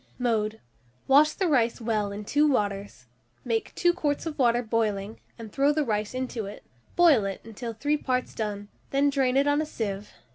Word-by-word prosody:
Mode. 220 Hz, -3 st, 0 dB, 0.5 s
Wash 290 Hz, +3 st, +5 dB
the 380 Hz, -, 0 dB
rice 240 Hz, -7 st, +2 dB
well 215 Hz, -3 st, -1 dB
in 205 Hz, +1 st, -6 dB
two 295 Hz, +7 st, +3 dB
waters; 200 Hz, -, -2 dB, 0.4 s
make 225 Hz, -2 st, -1 dB
2 350 Hz, 0 st, +3 dB
quarts 295 Hz, -4 st, -1 dB
of 315 Hz, -2 st, -5 dB
water 240 Hz, -1 st, +3 dB
boiling, 220 Hz, -2 st, -1 dB, 0.2 s
and 225 Hz, -3 st, -9 dB
throw 280 Hz, +4 st, +3 dB
the 300 Hz, 0 st, 0 dB
rice 210 Hz, 0 st, -2 dB
into 250 Hz, -5 st, -3 dB
it; 205 Hz, -, -10 dB, 0.3 s
boil 325 Hz, -11 st, +5 dB
it 195 Hz, -1 st, -4 dB
until 225 Hz, +1 st, -7 dB
three 290 Hz, +7 st, 0 dB
parts 255 Hz, -3 st, -2 dB
done, 205 Hz, -2 st, -4 dB, 0.2 s
then 280 Hz, +1 st, +2 dB
drain 265 Hz, -2 st, +1 dB
it 275 Hz, -, +4 dB
on 290 Hz, +1 st, +2 dB
a -, -, -2 dB
sieve. 205 Hz, -6 st, -4 dB
235 Hz, 185 wpm, -26 LUFS, 210-285 Hz, 0.5 s, Wash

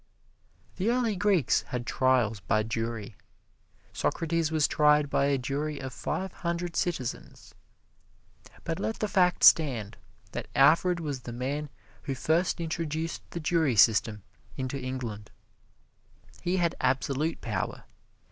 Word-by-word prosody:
The 195 Hz, +5 st, 0 dB
early 235 Hz, -3 st, +1 dB
Greeks 185 Hz, -, +2 dB
had 125 Hz, -1 st, -4 dB
trials 125 Hz, -6 st, +2 dB
by 110 Hz, +2 st, +1 dB
jury 115 Hz, -1 st, -4 dB, 0.8 s
Socrates 165 Hz, -1 st, -1 dB
was 155 Hz, -2 st, +3 dB
tried 150 Hz, -1 st, +3 dB
by 140 Hz, -, +2 dB
a 140 Hz, -1 st, +2 dB
jury 140 Hz, +4 st, -3 dB
of 130 Hz, -1 st, -6 dB
five 180 Hz, -, -3 dB
hundred 170 Hz, 0 st, -3 dB
citizens. 135 Hz, -9 st, -4 dB, 1.1 s
But 165 Hz, -1 st, -3 dB
let 220 Hz, -, -2 dB
the 215 Hz, -, -1 dB
fact 180 Hz, -3 st, +2 dB
stand 120 Hz, -10 st, +5 dB, 0.3 s
that -, -, -5 dB
Alfred 165 Hz, +6 st, +4 dB
was 145 Hz, -5 st, -3 dB
the 120 Hz, -, -7 dB
man 140 Hz, +5 st, -3 dB, 0.4 s
who 135 Hz, -3 st, -2 dB
first 165 Hz, +8 st, +1 dB
introduced 165 Hz, -1 st, -3 dB
the 170 Hz, -, -5 dB
jury 160 Hz, -5 st, +1 dB
system 105 Hz, -1 st, +4 dB, 0.3 s
into 130 Hz, +1 st, -3 dB
England. 120 Hz, -5 st, -5 dB, 1.1 s
He 180 Hz, +1 st, 0 dB
had 170 Hz, -2 st, +1 dB
absolute 140 Hz, +4 st, 0 dB
power. -, -, -4 dB
150 Hz, 130 wpm, -28 LUFS, 125-170 Hz, 1.1 s, stand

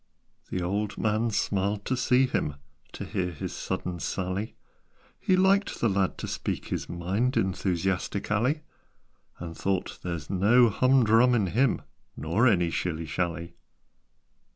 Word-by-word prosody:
The 90 Hz, -, -2 dB
old 100 Hz, +3 st, -2 dB
man 110 Hz, +2 st, +1 dB
smiled 100 Hz, -1 st, -1 dB
to 130 Hz, -, 0 dB
see 125 Hz, +1 st, +3 dB
him, 75 Hz, -, -1 dB, 0.4 s
To -, -, -6 dB
hear 90 Hz, -1 st, -2 dB
his 80 Hz, -, -6 dB
sudden 90 Hz, -1 st, -4 dB
sally; 95 Hz, +5 st, -3 dB, 0.6 s
He 185 Hz, -, +2 dB
liked 195 Hz, +2 st, +3 dB
the 115 Hz, -, +2 dB
lad 95 Hz, -1 st, 0 dB
to -, -, -5 dB
speak -, -, -4 dB
his -, -, -3 dB
mind 100 Hz, +10 st, -1 dB
Enthusiastically; 95 Hz, -, 0 dB, 0.8 s
And 85 Hz, -1 st, -7 dB
thought 95 Hz, +1 st, -2 dB
"There's 85 Hz, -5 st, -4 dB
no 110 Hz, +6 st, +4 dB
hum 130 Hz, +4 st, +4 dB
drum 115 Hz, +3 st, +5 dB
in 105 Hz, -4 st, +2 dB
him, 120 Hz, +8 st, +1 dB, 0.3 s
Nor 100 Hz, +11 st, +2 dB
any 90 Hz, -7 st, +3 dB
shilly 85 Hz, -2 st, -2 dB
shally." 85 Hz, +1 st, -3 dB
100 Hz, 135 wpm, -27 LUFS, 90-120 Hz, 0.8 s, drum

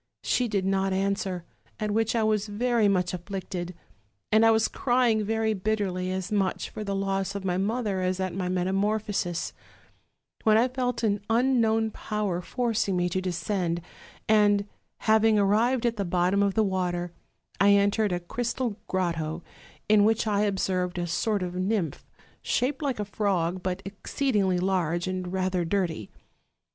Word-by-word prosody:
She 250 Hz, -, +1 dB
did 200 Hz, -4 st, -1 dB
not 195 Hz, 0 st, +1 dB
answer, 190 Hz, -2 st, -1 dB, 0.3 s
at 215 Hz, -1 st, -1 dB
which 225 Hz, +2 st, +1 dB
I 225 Hz, -, +2 dB
was 215 Hz, -1 st, +1 dB
very 230 Hz, +1 st, +1 dB
much 180 Hz, -3 st, +1 dB
afflicted; 180 Hz, -1 st, -5 dB, 0.6 s
and 220 Hz, +1 st, +5 dB
I 225 Hz, -, +7 dB
was 220 Hz, 0 st, +4 dB
crying 240 Hz, -4 st, +2 dB
very 220 Hz, +1 st, 0 dB
bitterly, 195 Hz, -3 st, -1 dB
as 190 Hz, +2 st, -3 dB
much 195 Hz, -3 st, 0 dB
for 215 Hz, -, -5 dB
the 200 Hz, -1 st, -2 dB
loss 195 Hz, 0 st, -1 dB
of 200 Hz, -1 st, -4 dB
my 180 Hz, -1 st, 0 dB
mother 210 Hz, -1 st, -1 dB
as 185 Hz, 0 st, -1 dB
at 185 Hz, -1 st, -2 dB
my 180 Hz, 0 st, -2 dB
metamorphosis, 195 Hz, -1 st, -1 dB, 0.9 s
when 215 Hz, 0 st, +5 dB
I 245 Hz, +3 st, +3 dB
felt 250 Hz, -2 st, -2 dB
an 205 Hz, -2 st, +1 dB
unknown 225 Hz, -2 st, +2 dB
power 210 Hz, -6 st, -2 dB
forcing 225 Hz, -2 st, -1 dB
me 175 Hz, 0 st, +1 dB
to 185 Hz, +2 st, -1 dB
descend; 175 Hz, -1 st, -1 dB, 0.5 s
and, 205 Hz, -2 st, +4 dB, 0.4 s
having 220 Hz, 0 st, +4 dB
arrived 225 Hz, +5 st, +2 dB
at 230 Hz, -2 st, 0 dB
the 200 Hz, -, 0 dB
bottom 180 Hz, +2 st, +1 dB
of 200 Hz, -1 st, +1 dB
the 220 Hz, -, +4 dB
water, 180 Hz, -3 st, -1 dB, 0.5 s
I 200 Hz, +2 st, +6 dB
entered 205 Hz, +1 st, +3 dB
a 175 Hz, -, 0 dB
crystal 235 Hz, +4 st, -3 dB
grotto, 170 Hz, -3 st, -2 dB, 0.4 s
in 210 Hz, -1 st, +5 dB
which 225 Hz, +2 st, +2 dB
I 205 Hz, -2 st, +1 dB
observed 185 Hz, -3 st, 0 dB
a 175 Hz, -, -1 dB
sort 200 Hz, +3 st, 0 dB
of 180 Hz, -1 st, -4 dB
nymph, 185 Hz, -4 st, -2 dB, 0.3 s
shaped 265 Hz, +4 st, 0 dB
like 270 Hz, -6 st, -1 dB
a 210 Hz, -, -1 dB
frog, 185 Hz, -4 st, -1 dB
but 185 Hz, +1 st, -3 dB
exceedingly 200 Hz, -1 st, 0 dB
large, 175 Hz, -2 st, 0 dB
and 185 Hz, -1 st, -3 dB
rather 185 Hz, -1 st, 0 dB
dirty. 165 Hz, -, -1 dB
200 Hz, 160 wpm, -27 LUFS, 185-220 Hz, 0.9 s, I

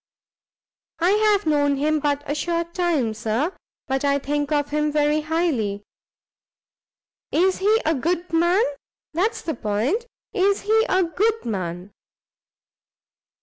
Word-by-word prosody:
"I 350 Hz, +2 st, +2 dB
have 420 Hz, -1 st, +3 dB
known 290 Hz, -2 st, +2 dB
him 305 Hz, +2 st, +1 dB
but 290 Hz, -1 st, 0 dB
a 290 Hz, -, -2 dB
short 335 Hz, +2 st, -2 dB
time, 320 Hz, -11 st, 0 dB
Sir; 230 Hz, -, -1 dB, 0.3 s
but 265 Hz, +1 st, -1 dB
I 280 Hz, 0 st, +3 dB
think 290 Hz, +1 st, -2 dB
of 290 Hz, -1 st, 0 dB
him 300 Hz, 0 st, +1 dB
very 300 Hz, +1 st, +2 dB
highly." 300 Hz, -11 st, -1 dB, 1.5 s
"Is 370 Hz, +3 st, +2 dB
he 425 Hz, +3 st, +3 dB
a 320 Hz, -, +3 dB
good 340 Hz, +5 st, -2 dB
man? 345 Hz, +6 st, +3 dB, 0.5 s
that's 380 Hz, +8 st, 0 dB
the 320 Hz, -, -2 dB
point, 235 Hz, -, -1 dB, 0.3 s
is 400 Hz, 0 st, +2 dB
he 440 Hz, +2 st, +3 dB
a 375 Hz, 0 st, +3 dB
good 420 Hz, +7 st, 0 dB
man?" 185 Hz, -3 st, -4 dB
310 Hz, 130 wpm, -23 LUFS, 280-365 Hz, 1.5 s, have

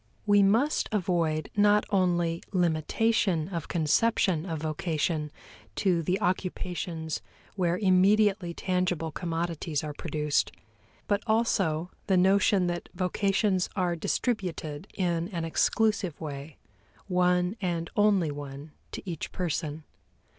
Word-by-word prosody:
We 205 Hz, -1 st, +5 dB
must 230 Hz, +10 st, +2 dB
avoid 170 Hz, -6 st, 0 dB
not 205 Hz, 0 st, +4 dB
only 175 Hz, -3 st, +1 dB
limitation 175 Hz, +1 st, +1 dB
of 170 Hz, -5 st, -4 dB
conception 175 Hz, +1 st, +1 dB
of 160 Hz, -3 st, -3 dB
vocation 155 Hz, -1 st, -1 dB, 0.4 s
to 180 Hz, -4 st, +2 dB
the 180 Hz, +4 st, 0 dB
occupations 180 Hz, -3 st, -2 dB, 0.3 s
where 175 Hz, -2 st, +1 dB
immediately 195 Hz, 0 st, +3 dB
tangible 180 Hz, -2 st, -1 dB
commodities 165 Hz, -3 st, -2 dB
are 150 Hz, -1 st, -4 dB
produced, 150 Hz, -1 st, -1 dB, 0.6 s
but 205 Hz, 0 st, +1 dB
also 190 Hz, -7 st, +1 dB, 0.2 s
the 190 Hz, -2 st, +3 dB
notion 190 Hz, +1 st, +4 dB
that 175 Hz, 0 st, -3 dB
vocations 190 Hz, +1 st, +1 dB
are 180 Hz, -3 st, +1 dB
distributed 175 Hz, -, -2 dB
in 170 Hz, -3 st, 0 dB
an 170 Hz, -5 st, -4 dB
exclusive 200 Hz, 0 st, +1 dB
way, 145 Hz, -1 st, -7 dB, 0.5 s
one 180 Hz, +1 st, +2 dB
and 170 Hz, -3 st, -2 dB
only 200 Hz, -7 st, +3 dB
one 145 Hz, +1 st, -8 dB, 0.2 s
to -, -, -7 dB
each 170 Hz, -4 st, -4 dB
person. 160 Hz, -3 st, -3 dB
180 Hz, 110 wpm, -28 LUFS, 160-195 Hz, 0.6 s, We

